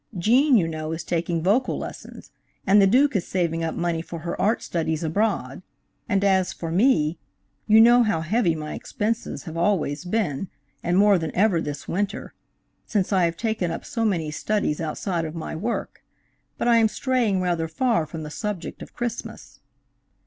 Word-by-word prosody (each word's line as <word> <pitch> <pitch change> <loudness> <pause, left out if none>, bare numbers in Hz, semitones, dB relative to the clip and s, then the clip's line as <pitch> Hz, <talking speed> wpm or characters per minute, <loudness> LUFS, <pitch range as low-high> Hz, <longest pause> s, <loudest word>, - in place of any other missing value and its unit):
Gene, 245 - +4
you 170 -5 +2
know, 155 -1 -4
is 165 - -5
taking 170 -1 -1
vocal 225 +8 +2
lessons, - - -9 0.3
and 200 +1 +6
the 195 - +6
Duke 260 +5 +3
is 185 - 0
saving 165 -3 -1
up 165 - -2
money 170 -1 -1
for 170 0 -8
her 170 +1 -4
art 215 +3 +1
studies 160 -1 -2
abroad, 205 +8 -1 0.5
and 200 -2 +2
as 190 -2 +2
for 165 -1 -5
me, 175 - +2 0.5
you 220 0 +6
know 240 +2 +7
how 210 -8 +1
heavy 175 0 +1
my 155 -1 -5
expenses 225 +2 -3
have 160 -3 -8
always 165 -4 0
been, 185 -4 -1 0.3
and 175 +1 0
more 200 -1 +5
than 160 -1 -3
ever 190 -3 +3
this 145 -1 -6
winter, 200 +3 -3 0.5
since 200 -1 0
I 185 -2 +4
have 170 0 -2
taken 220 -4 -1
up 165 - -5
so 235 -6 -2
many 170 -8 0
studies 185 -2 -1
outside 165 +2 -2
of 155 0 -5
my 165 0 -5
work. 220 +9 -4 0.5
But - - -1
I 235 -1 +5
am 225 -1 +5
straying 235 -4 0
rather 175 -3 0
far 170 -1 0
from 160 +1 -7
the 150 - -7
subject 205 0 -5
of - - -11
Christmas. 240 -1 -6
180 Hz, 180 wpm, -24 LUFS, 165-220 Hz, 0.5 s, know